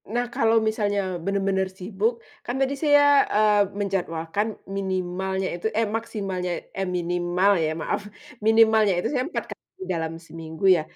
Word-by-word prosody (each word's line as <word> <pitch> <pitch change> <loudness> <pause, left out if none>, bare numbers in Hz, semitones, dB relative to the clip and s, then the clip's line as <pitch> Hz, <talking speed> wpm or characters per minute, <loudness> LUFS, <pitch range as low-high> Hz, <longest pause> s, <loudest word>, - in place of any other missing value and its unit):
Nah, 240 +3 0
kalau 225 0 +3
misalnya 205 -2 0 0.3
bener-bener 195 -1 0
sibuk, 200 +4 0 0.3
kan 245 - -3
tadi 270 +1 +1
saya, 290 -1 +6 0.4
eee, 210 -1 +5 0.2
menjadwalkan 190 0 -1 0.3
minimalnya 190 0 -2
itu 175 - -9
eh 225 - +3
maksimalnya 195 -5 -4 0.3
eh 195 - -1
minimal 175 +2 +1
ya 155 - +1
maaf, - - -1 0.4
minimalnya 220 -2 +5
itu 175 - 0
saya 255 -2 +1
4 - - -3
kali - - -40 0.3
dalam 160 -1 -2
seminggu 160 +2 -6
ya. - - -1
195 Hz, 140 wpm, -24 LUFS, 180-220 Hz, 0.4 s, saya